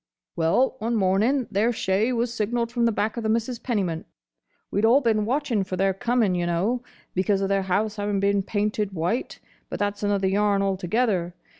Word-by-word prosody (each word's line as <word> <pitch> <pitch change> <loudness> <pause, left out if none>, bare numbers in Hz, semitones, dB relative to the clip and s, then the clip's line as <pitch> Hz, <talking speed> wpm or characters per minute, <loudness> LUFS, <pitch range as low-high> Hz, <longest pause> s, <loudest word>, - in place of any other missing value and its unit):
"Well, 245 +12 +2
one 230 +2 -1
morning 215 +7 +2
their 215 +5 +2
shay 215 +1 0
was 235 -1 -1
signalled 230 +2 -1
from 240 -1 +1
the 230 - +3
back 215 +1 -1
of - - -1
the 220 - -1
Misses 230 +2 -1
Pennymint. 190 -11 -2 0.6
We'd 200 - 0
all 235 +5 +6
been 220 -5 +1
watching 245 -4 0
for 185 0 -4
their 195 +1 +2
coming, 225 0 +1
y' 175 -1 0
know, 190 +9 0 0.3
because 195 +2 +1
of 195 0 -1
their 195 0 +2
house 210 +3 0
having 205 -1 -1
been 200 0 +2
painted 205 0 -1
white—but 180 +8 -4
that's 205 0 -2
another 205 -2 +1
yarn 200 +1 +2
altogether. 190 -1 0
205 Hz, 180 wpm, -24 LUFS, 195-235 Hz, 0.6 s, all